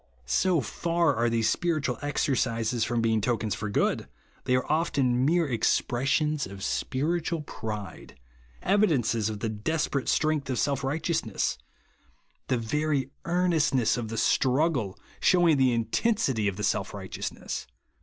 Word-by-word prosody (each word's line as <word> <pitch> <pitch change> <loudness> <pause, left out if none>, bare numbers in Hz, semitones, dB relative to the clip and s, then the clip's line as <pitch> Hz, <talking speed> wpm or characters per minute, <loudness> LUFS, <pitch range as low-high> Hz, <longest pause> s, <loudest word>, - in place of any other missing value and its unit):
So 170 - +2
far 170 +5 0
are 115 +1 +1
these 115 -1 +1
spiritual 155 -4 0
exercises 125 -5 0
from 120 0 0
being 110 -1 +2
tokens 110 -2 0
for 105 +1 -4
good, 100 - 0 0.4
they 125 - +2
are 125 - 0
often 135 -6 +1
mere 170 0 +2
expressions 140 +4 +1
of 95 0 -9
spiritual 160 +7 -1
pride, 105 - -7 0.2
— - - -27
evi 205 +1 +4
dences 115 - +1
of 105 -2 -6
the 115 - -1
desperate 140 +5 -1
strength 155 -3 +1
of 130 - -1
self 140 +2 0
righteousness; 145 - -1 0.9
the 125 - +1
very 135 +3 -1
earnestness 165 -8 +2
of 120 -2 -3
the 115 +1 -5
.struggle 130 - +1 0.2
shewing 175 -5 +4
the 130 -1 +4
intensity 120 - +1
of 100 -2 -2
the 105 - -4
self - - -1
righteousness. - - -5
130 Hz, 140 wpm, -27 LUFS, 110-155 Hz, 0.9 s, evi